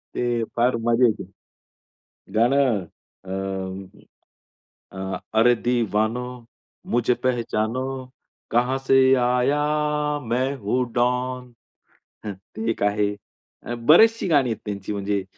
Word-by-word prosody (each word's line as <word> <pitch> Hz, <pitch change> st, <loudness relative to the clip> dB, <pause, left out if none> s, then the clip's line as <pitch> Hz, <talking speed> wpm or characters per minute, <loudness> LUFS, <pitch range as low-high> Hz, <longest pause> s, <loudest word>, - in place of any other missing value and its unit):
ते 120 Hz, -1 st, 0 dB
फार 120 Hz, +1 st, +3 dB
मजा 120 Hz, +2 st, +4 dB
येते. 110 Hz, -3 st, 0 dB, 1.1 s
गाणं 120 Hz, -4 st, +2 dB, 0.4 s
अं, 95 Hz, 0 st, -5 dB, 1.0 s
अ, 95 Hz, -1 st, -5 dB, 0.2 s
अरे 120 Hz, +2 st, +5 dB
दिवानो 115 Hz, -1 st, 0 dB, 0.7 s
मुझे 120 Hz, 0 st, +3 dB
पेहेचानो 120 Hz, -1 st, 0 dB, 0.7 s
कहाँ 125 Hz, +3 st, +2 dB
से 135 Hz, -, +5 dB, 0.3 s
आया 125 Hz, +4 st, +2 dB, 0.7 s
मैं 130 Hz, +4 st, 0 dB
हूँ 125 Hz, +3 st, 0 dB
डॉन. 125 Hz, 0 st, -1 dB, 0.7 s
ते 105 Hz, +3 st, -6 dB
एक 110 Hz, -, -4 dB
आहे 105 Hz, 0 st, +1 dB, 0.7 s
बरेचशी 225 Hz, +7 st, +6 dB
गाणी 145 Hz, -7 st, +3 dB
आहेत 110 Hz, -, -2 dB
त्यांची 100 Hz, -1 st, -4 dB
म्हणजे, 100 Hz, -1 st, -1 dB
120 Hz, 100 wpm, -23 LUFS, 105-125 Hz, 1.1 s, बरेचशी